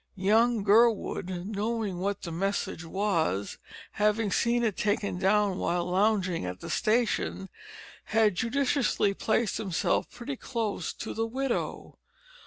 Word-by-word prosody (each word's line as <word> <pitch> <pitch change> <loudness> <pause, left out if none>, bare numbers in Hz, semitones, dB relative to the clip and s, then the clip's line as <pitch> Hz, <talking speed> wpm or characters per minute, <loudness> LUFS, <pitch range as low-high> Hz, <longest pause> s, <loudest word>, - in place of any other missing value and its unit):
Young 220 +3 +3
Gurwood, 200 -4 +2
knowing 210 -2 -2
what 200 +2 -2
the 170 - -5
message 195 0 -2
was, 165 - -1 0.3
having 210 0 +1
seen 240 +3 +2
it 215 -5 0
taken 205 -3 -1
down 195 0 +2
while 175 0 0
lounging 185 - +1
at 90 0 -5
the - - -6
station, 215 -4 0 0.6
had 215 -1 +3
judiciously 240 - +1
placed 220 +2 0
himself 195 -6 0
pretty 245 +3 -6
close 220 -9 -3
to - - -6
the 225 0 -1
widow. 260 +2 -3
210 Hz, 125 wpm, -28 LUFS, 185-225 Hz, 0.6 s, Young